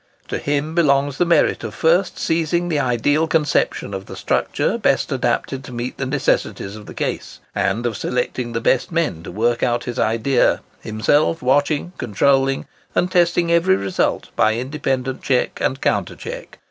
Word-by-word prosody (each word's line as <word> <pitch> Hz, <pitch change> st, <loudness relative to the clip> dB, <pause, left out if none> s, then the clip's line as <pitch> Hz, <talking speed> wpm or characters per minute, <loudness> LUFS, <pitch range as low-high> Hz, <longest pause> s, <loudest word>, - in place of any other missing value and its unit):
To -, -, -2 dB
him 145 Hz, +2 st, -1 dB
belongs 140 Hz, -4 st, +2 dB
the 175 Hz, -, +3 dB
merit 170 Hz, -7 st, +3 dB
of 110 Hz, -, -5 dB
first 175 Hz, +3 st, +2 dB
seizing 170 Hz, +2 st, 0 dB
the 155 Hz, -3 st, +1 dB
ideal 145 Hz, +5 st, +1 dB
conception 150 Hz, -9 st, 0 dB
of 95 Hz, 0 st, -6 dB
the -, -, -8 dB
structure -, -, 0 dB
best -, -, +1 dB
adapted 135 Hz, 0 st, -1 dB
to -, -, -9 dB
meet 120 Hz, +1 st, -5 dB
the 135 Hz, -, -1 dB
necessities 130 Hz, -7 st, -1 dB
of 105 Hz, -1 st, -11 dB
the -, -, -10 dB
case; -, -, -4 dB
and 120 Hz, +2 st, 0 dB
of 115 Hz, -3 st, -1 dB
selecting 125 Hz, +1 st, -2 dB
the 115 Hz, -, -1 dB
best 130 Hz, +9 st, +1 dB
men 160 Hz, -, -1 dB
to -, -, -8 dB
work 115 Hz, +5 st, 0 dB
out 120 Hz, -1 st, +1 dB
his 120 Hz, 0 st, -5 dB
idea, 115 Hz, +4 st, +2 dB, 0.2 s
himself 145 Hz, +9 st, +1 dB
watching, 145 Hz, +5 st, +1 dB
controlling, 135 Hz, +5 st, +2 dB, 0.3 s
and 180 Hz, -, +1 dB
testing 175 Hz, -1 st, +2 dB
every 170 Hz, +3 st, +4 dB
result, 100 Hz, -, -1 dB
by 110 Hz, 0 st, +3 dB
independent 130 Hz, 0 st, -2 dB
check 130 Hz, -2 st, 0 dB
and 135 Hz, -, 0 dB
counter -, -, 0 dB
check. -, -, -8 dB
135 Hz, 170 wpm, -20 LUFS, 120-160 Hz, 0.3 s, every